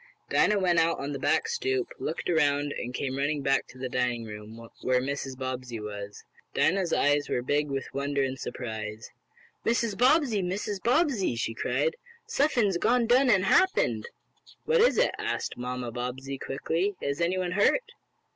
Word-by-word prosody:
Dinah 210 - +4
went 180 -3 +3
out 165 0 +2
on 140 +1 -3
the 140 - -4
back 445 - +2
stoop, 400 -5 -1
looked 160 - -3
around 145 -3 +2
and 120 - -4
came 130 +1 -3
running 145 0 0
back 135 0 +2
to 130 - -15
the 130 0 -3
dining 125 -2 -1
room, 110 +2 -9
where 125 0 +2
Mrs. 135 0 -4
Bobbsey 130 -3 -4
was. 105 -1 -7 0.3
Dinah's 180 0 +2
eyes 145 -1 +2
were 125 - 0
big 145 +3 0
with 135 -1 -2
wonder 140 0 0
and 135 0 -3
surprise. 110 -2 -6 0.5
"Mrs. 230 -3 +1
Bobbsey! 250 -3 +3
Mrs. 190 +2 -3
Bobbsey!" 245 - +2
she 115 0 -2
cried. 480 - 0 0.3
"Suffin's 245 - +2
done 235 +3 +3
gone 255 +3 +4
an' 195 -5 +4
happened!" 380 - +3 0.6
"What 475 -1 +3
is 485 - +4
it?" - - +4
asked - - -2
Mamma 125 -1 -4
Bobbsey, 130 +3 -5
quickly. 165 +8 -1
"Is 140 +3 -2
anyone 180 +1 0
hurt?" 460 - +2
145 Hz, 165 wpm, -28 LUFS, 125-210 Hz, 0.6 s, Dinah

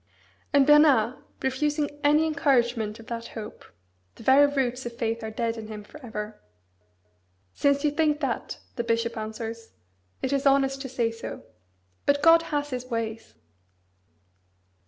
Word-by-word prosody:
And 280 -2 +5
Bernard 285 -6 +5 0.2
refusing 295 +3 0 0.2
any 300 +2 +4
encouragement 240 -8 +1
of 230 - -12
that 230 0 -5
hope 215 -1 -8 0.5
(the - - -13
"very 275 +4 +6
roots 260 -2 -1
of 235 0 -7
faith 230 -2 -2
are 220 - -3
dead" 230 +1 -2
in 220 -1 -7
him 215 -1 -7
for 300 +7 -14
ever) 215 -2 -6 1.1
"since 280 0 +2
you 295 - +3
think 300 0 +1
that," 270 -6 -3 0.2
the 235 - 0
bishop 230 0 0
answers, 225 +1 -6 0.5
"it 265 - 0
is 275 0 +2
honest 270 0 +3
to 265 - -5
say 240 -3 0
so. 230 0 -8 0.6
But 285 0 +3
God 330 +1 +7
has 290 -1 -2
His 255 0 -4
ways!" 225 -2 -4
250 Hz, 150 wpm, -26 LUFS, 230-285 Hz, 1.1 s, God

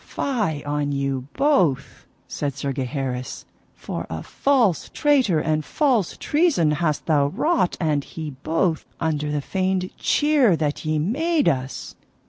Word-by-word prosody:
Fie 210 - -2
on 145 0 -1
you 135 -2 -2
both, 180 - +1 0.2
said 140 -3 -3
Sir 140 -1 -3
Gaheris, 130 -1 -4 0.3
for - - -6
a 80 0 -5
false 245 - +1
traitor, 265 - +2
and 155 0 0
false 250 - +1
treason 295 - +2
hast 150 -1 -1
thou 145 -3 +3
wrought 220 - 0
and 150 -4 +1
he 155 0 -7
both, 160 +5 -1 0.2
under 150 -2 -1
the 150 -1 -1
feigned 185 +2 -1
cheer 290 - +3
that 155 -1 -2
ye 155 0 +1
made 290 - +1
us! 130 0 -2
160 Hz, 135 wpm, -23 LUFS, 145-230 Hz, 0.3 s, thou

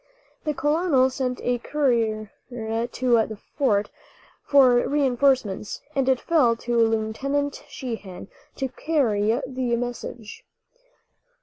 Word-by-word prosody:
The 300 -1 -1
colonel 295 -3 +2
sent 255 -1 -2
a 245 0 0
courier 230 -7 0 0.2
to 235 0 0
the 215 - -7 0.2
fort 210 -8 +1 0.5
for 260 -4 +5
reinforcements, 260 -7 +1
and 270 -2 +1
it 260 -1 +3
fell 290 -9 +3
to 240 +1 -3
Lieutenant 230 +6 0
Sheehan 215 -8 -7 0.3
to 270 - -2
carry 235 -8 +1
the 255 -2 -1
message. 240 -2 -6
245 Hz, 105 wpm, -24 LUFS, 225-275 Hz, 0.5 s, for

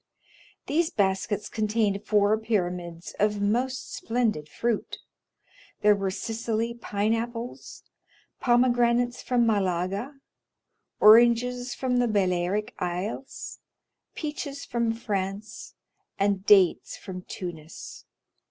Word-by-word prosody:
These 320 +3 +1
baskets 200 +1 0
contained 215 -2 0
four 210 0 +4
pyramids 175 -6 -2
of 210 0 +2
most 245 +6 -1
splendid 225 -11 -1
fruit; 230 +5 -2 0.8
there 210 0 +6
were 195 -1 -1
Sicily 225 +3 -2
pine 215 -2 -1
apples, 235 +1 -5 0.6
pomegranates 245 0 +3
from 245 -2 +2
Malaga, 200 +4 0 0.8
oranges 240 +3 +5
from 255 -2 0
the 245 - +3
Balearic 195 0 0
Isles, 180 +9 -4 0.6
peaches 295 -2 -5
from 235 -1 0
France, 210 -1 -4 0.4
and 200 0 0
dates 195 -4 +4
from 185 -1 -7
Tunis. 170 -4 -8
215 Hz, 95 wpm, -26 LUFS, 195-240 Hz, 0.8 s, there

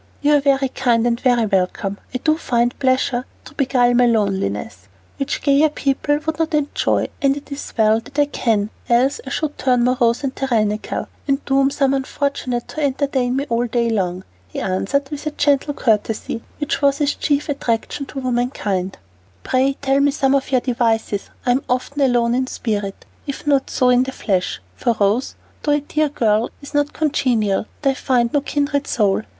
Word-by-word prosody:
"You 295 +1 +4
are - - +5
very 275 -1 +2
kind 240 -3 +1
and 235 -1 +1
very 245 -3 +3
welcome. 195 0 -1
I 255 - -2
do 310 +4 +2
find 240 -5 0
pleasures 255 -2 +1 0.2
to - - -12
beguile 250 -4 +2
my 245 0 +4
loneliness, 190 - -1 0.3
which 275 - -3
gayer 285 +2 +4
people 290 0 0
would 320 0 -2
not 325 -1 0
enjoy, 295 -1 0
and 275 0 +2
it 290 0 -11
is 280 - -6
well 220 0 +4
that 260 +5 -14
I 290 - +5
can, 220 -7 0 0.2
else 260 - +3
I - - -3
should 300 -2 -3
turn 250 -2 +2
morose 245 0 +2
and 270 -1 -2
tyrannical, 215 -5 -1 0.2
and 275 0 0
doom 270 0 +3
some 275 -1 +1
unfortunate 265 -2 -2
to 310 - -5
entertain 265 -2 0
me 275 +1 -1
all 235 0 0
day 235 0 0
long." 185 -3 -1 0.2
He 90 - -6
answered 195 +9 -1
with 295 +1 -5
a 305 - -5
gentle 285 0 +2
courtesy 225 -1 0 0.2
which 295 -1 -2
was 280 -1 +3
his 290 -1 +1
chief 290 -1 0
attraction 275 0 -2
to 270 - -6
womankind. 225 -7 -1 0.5
"Pray 265 +2 +2
tell 270 0 +3
me 285 0 +4
some 275 -1 +1
of 275 -1 0
your 255 -2 +3
devices, 225 -5 0 0.2
I'm 250 +2 +2
often 255 +3 -1
alone 240 -3 +3
in 255 +1 0
spirit, 205 -6 -3 0.2
if 280 - -5
not 280 -2 +2
so 255 - +2
in 250 0 +5
the 265 +1 -2
flesh, 185 - -2
for 230 - 0
Rose, 210 +6 +1 0.3
though 295 - +1
a 295 - +1
dear 300 +1 0
girl, 225 -5 +1
is 285 - -11
not 290 0 +1
congenial, 235 -10 +1 0.2
and 275 - +4
I - - -2
find 245 -3 +1
no 290 - +3
kindred 285 0 -1
soul." 205 -3 +1
255 Hz, 185 wpm, -20 LUFS, 230-280 Hz, 0.5 s, are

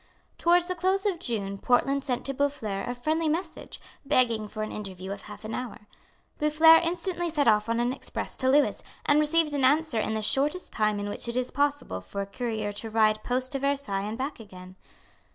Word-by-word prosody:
Towards 345 +1 +4
the 365 - -2
close 375 +3 0
of 380 -5 0
June 200 -7 -3
Portland 275 +4 +2
sent 250 -4 -1
to 275 - -1
Boufflers 250 -8 -2
a 245 - -3
friendly 315 +4 0
message, 335 +5 -4 0.2
begging 235 -6 +2
for 215 +1 -5
an 215 - -5
interview 190 -2 -6
of 200 0 -6
half 210 +2 -11
an 220 - -5
hour. 250 -4 -5 0.6
Boufflers 315 +2 +6
instantly 345 0 -2
sent 295 -4 +1
off 210 0 +3
an 240 +2 +1
express 270 - -5
to 260 - +2
Lewis, 285 +2 +3 0.2
and 290 +1 +4
received 305 0 +3
an 280 -2 0
answer 290 -2 +3
in 220 0 -1
the 215 - -2
shortest 295 +10 0
time 215 -1 +1
in 205 - -3
which 205 - -5
it 235 - -4
was 250 0 -1
possible 285 - -1
for 145 - -7
a - - -3
courier 220 -1 -3
to 220 +2 -5
ride 215 -1 +2
post 255 +1 -1
to 275 - -2
Versailles 275 -8 0
and 210 +3 -4
back 270 +2 -4
again. 185 -4 -12
255 Hz, 205 wpm, -27 LUFS, 215-300 Hz, 0.6 s, Boufflers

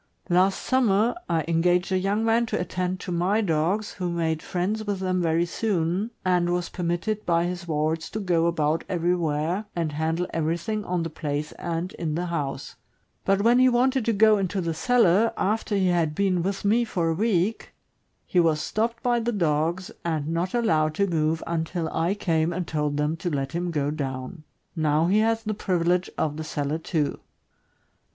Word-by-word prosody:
Last 185 +2 +3
summer, 235 -3 +3 0.2
I 160 -2 +1
engaged 175 +3 +2
a 190 - +3
young 200 +4 0
man 230 +1 +2
to - - -1
attend 180 +1 -2
to 185 - -5
my 180 +5 +1
dogs, 190 +2 0
who 180 -2 -3
made 165 -2 -1
friends 195 +5 -2
with 205 -2 -2
them 185 -1 0
very 165 0 +2
soon, 185 +1 -1 0.2
and 180 -1 +2
was 175 -1 -1
permitted 180 +5 -2
by 170 0 +2
his 175 0 -4
wards 160 +1 -1
to 215 - -4
go 175 -4 +2
about 160 -1 0
everywhere, 175 +1 0
and 165 -3 -1
handle 160 +3 -1
everything 170 +7 -1
on 180 -1 -1
the 165 - -4
place 150 -1 -3
and 170 +3 -4
in 155 -3 -2
the 175 +2 -1
house; 145 -4 -4 0.5
but 195 +1 +2
when 240 +2 +5
he 255 0 +6
wanted 255 +1 +2
to 230 - +2
go 215 0 +5
into 195 0 -1
the 170 -2 -1
cellar, 225 +3 +3
after 215 +1 0
he 190 -2 +2
had 165 -4 +1
been 190 -2 +1
with 195 +3 -3
me 225 +4 +3
for 175 -7 -1
a - - +1
week, 205 +2 0 0.5
he 180 - +1
was 160 -3 +3
stopped 230 +7 -2
by 240 -1 +2
the 235 +1 -1
dogs, 170 -1 0
and 155 -3 -1
not 170 +5 -1
allowed 155 -10 +2
to 200 - +2
move 160 -3 0
until 165 0 -2
I 170 +5 +1
came 165 -5 0
and 175 +1 -3
told 150 -2 -1
them 150 +2 0
to 175 - -3
let 135 -3 -2
him 175 +1 -2
go 145 -3 -1
down. 140 +2 -5 0.3
Now 155 0 +2
he 195 +5 +3
has 225 +1 +1
the 215 -1 -2
privilege 180 -2 0
of 150 -1 -1
the 160 - -4
cellar, 150 0 -2
too. 160 -3 -1
175 Hz, 190 wpm, -25 LUFS, 160-200 Hz, 0.5 s, he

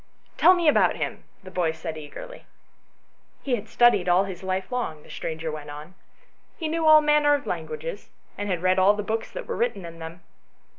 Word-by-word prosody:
" - - -35
Tell 370 - +7
me 345 -2 0
about 300 - +4
him," - - -4 0.2
the 185 - -11
boy 170 -3 0
said 160 0 -6
eagerly. 155 - -10 1.0
"He 270 - -2
had 215 -1 -7
studied 240 -6 +4
all 180 +2 +5
his 190 -2 -7
life 190 +3 -3
long," 160 -12 -3
the - - -14
stranger 160 0 -4
went 150 -1 -8
on; 150 +4 -9 0.6
"he 320 - -3
knew 320 0 0
all 310 0 +8
manner 295 -1 +4
of 285 - -5
languages, 475 +2 -5 0.3
and 205 0 -4
had 180 -2 -2
read 185 0 +3
all 195 +2 +5
the 210 - -3
books 220 +2 -3
that - - -7
were - - -4
written 230 -6 -1
in 165 0 -10
them. 165 +2 -9
195 Hz, 205 wpm, -25 LUFS, -, 1.0 s, all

